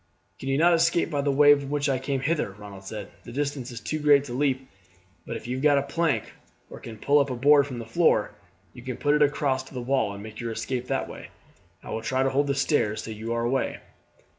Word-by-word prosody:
"Can 135 - -5
you 135 - +2
not 170 +3 +5
escape 170 0 +2
by 145 -2 0
the 140 - 0
way 145 +1 +7
by 140 -1 -1
which 145 +1 -1
I 135 -2 +1
came 135 0 -2
hither?" 145 -8 -1
Ronald 100 -2 -11
said. 105 +2 -7
"The - - -10
distance 140 -1 -3
is 120 -2 -7
too 155 +5 -3
great 145 -2 +5
to 130 -4 -7
leap; 130 0 0 0.6
but - - -3
if - - -12
you 125 +2 -3
have 130 - -5
got 145 -2 +5
a 140 - +1
plank, 165 +2 -1 0.4
or - - -9
can 115 -2 -9
pull 145 +7 +3
up 140 -1 +1
a 130 - -2
board 140 +3 +5
from 130 -3 -6
the 115 - -6
floor, 115 -2 +2 0.4
you 125 - -11
could 125 -1 -6
put 145 0 +2
it 150 - +2
across 140 -2 +2
to - - -14
the - - -3
wall 130 -5 +1
and 100 - -9
make 110 0 -10
your 115 -1 -3
escape 125 +2 -3
that - - -1
way. - - -10 0.5
I - - -8
will 110 - -3
try 130 +4 0
to 135 - +1
hold 140 +2 +1
the 140 - 0
stairs 130 -6 +1
till 110 - -6
you 110 +2 -6
are 115 0 -1
away." 130 +3 -1
135 Hz, 260 wpm, -26 LUFS, 120-145 Hz, 0.6 s, way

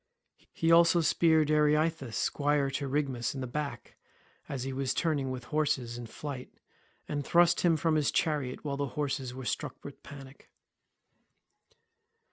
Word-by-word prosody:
He 165 0 +1
also 170 +1 +6
speared 160 -1 +3
Areithous 150 -4 +2
squire 145 +1 +1
to 140 0 -3
Rhigmus 135 -4 -1
in 135 - -4
the - - -2
back 145 +3 -5 0.5
as 135 -3 -3
he 135 0 -4
was 135 0 -1
turning 145 -6 0
his 125 -1 -5
horses 130 -4 -1
in 120 -1 -7
flight, 135 +1 -7 0.6
and 145 -1 -2
thrust 170 +3 +4
him 170 -2 +3
from 160 +1 +1
his 150 -2 +2
chariot, 150 -4 -1
while 140 -1 -2
the 140 0 -1
horses 135 -4 -2
were 130 -1 -7
struck - - -4
with - - -9
panic. 135 -1 -12
145 Hz, 150 wpm, -30 LUFS, 130-155 Hz, 0.6 s, also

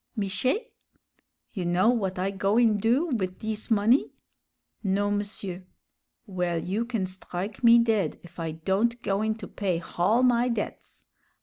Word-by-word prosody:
"Miché?" 255 - -1 0.8
"You 190 - -3
know 175 +5 +3
w'at 195 -6 -1
I 190 +2 0
goin' 210 +3 +2
do 250 - +2
wid 185 -8 -2
dis 215 +1 -4
money?" 225 +4 +3 0.7
"Non, 205 +1 +1
m'sieur." 200 -3 -6 0.6
"Well, 180 -4 -1
you 200 +7 -2
can 230 -6 -2
strike 185 +3 -6
me 235 0 +8
dead 220 -8 +1
if 175 0 -14
I 165 -1 -2
don't 200 +9 0
goin' 215 +2 0
to 215 -3 -9
pay 185 -4 -1
hall 195 +8 +1
my 245 0 +3
debts! 230 -3 -5
205 Hz, 140 wpm, -27 LUFS, 185-230 Hz, 0.8 s, me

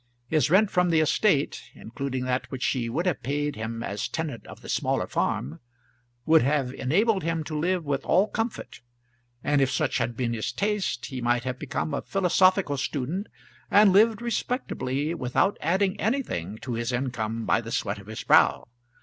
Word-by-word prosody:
His 155 -3 +2
rent 200 +4 +4
from 180 0 +2
the 165 -2 +3
estate, 155 -1 +2
including 130 +2 -4
that 130 0 -1
which 130 -2 -5
she 120 -3 0
would 160 +10 -1
have 180 -5 0
paid 145 +3 -2
him 115 +1 -4
as 100 -1 -3
tenant 155 -8 -5
of - - -11
the - - -11
smaller - - 0
farm, 75 +6 -2 0.7
would 160 0 +6
have 135 -1 0
enabled 195 - +1
him 165 -1 -1
to 155 0 -6
live 175 +2 0
with 140 -1 -1
all 190 +5 +3
comfort; 225 +1 -4 0.6
and, 145 -1 +2
if 135 - +3
such - - 0
had 120 -1 -2
been 120 -2 -1
his 110 -2 -2
taste, 200 - -1
he 130 -2 -6
might 120 0 +1
have 125 0 -4
become 155 +1 -3
a - - -1
philosophical 185 -4 +2
student, 145 - -3 0.4
and 205 -2 +6
lived 220 +3 +4
respectably 165 - -2
without 150 +7 +1
adding 190 +5 +1
anything 110 - -2
to 125 - -4
his 115 +2 -2
income 115 -3 -2
by - - +2
the 115 0 -8
sweat 105 -2 -2
of 100 - -14
his 110 0 -6
brow. - - +4
145 Hz, 180 wpm, -26 LUFS, 120-185 Hz, 0.7 s, would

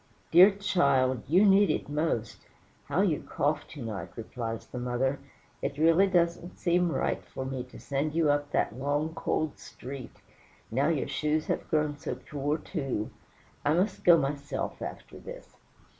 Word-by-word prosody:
"Dear 180 +4 +9
child, 140 - +2
you 185 +7 +5
need 200 -1 +6
it - - -1
most. 145 -7 -2 0.4
How 185 - +1
you 175 -7 +1
cough 150 +2 -1
to 145 -5 -8
night!" 110 -4 -5
replies 115 -1 -5
the 125 - -7
mother; 125 +3 0 0.4
"it 140 0 -3
really 165 +5 +5
don't 175 -1 0
seem 175 -1 +2
right - - -1
for 130 - -6
me 130 -1 -3
to 125 - -14
send 145 +3 -2
you 160 -3 +4
up 145 0 0
that 110 - 0
long, 145 +4 -1
cold 155 -2 -2
street; 130 0 -9 0.6
now 130 +5 +2
your 155 -4 0
shoes 155 0 0
have - - -2
grown 150 -2 0
so - - -3
poor, 145 +1 -2
too; 135 - -3 0.5
I 150 - +3
must 190 +3 0
go 175 -1 +8
myself 140 -1 -3
after - - -7
this." - - -11
150 Hz, 160 wpm, -29 LUFS, 135-170 Hz, 0.6 s, Dear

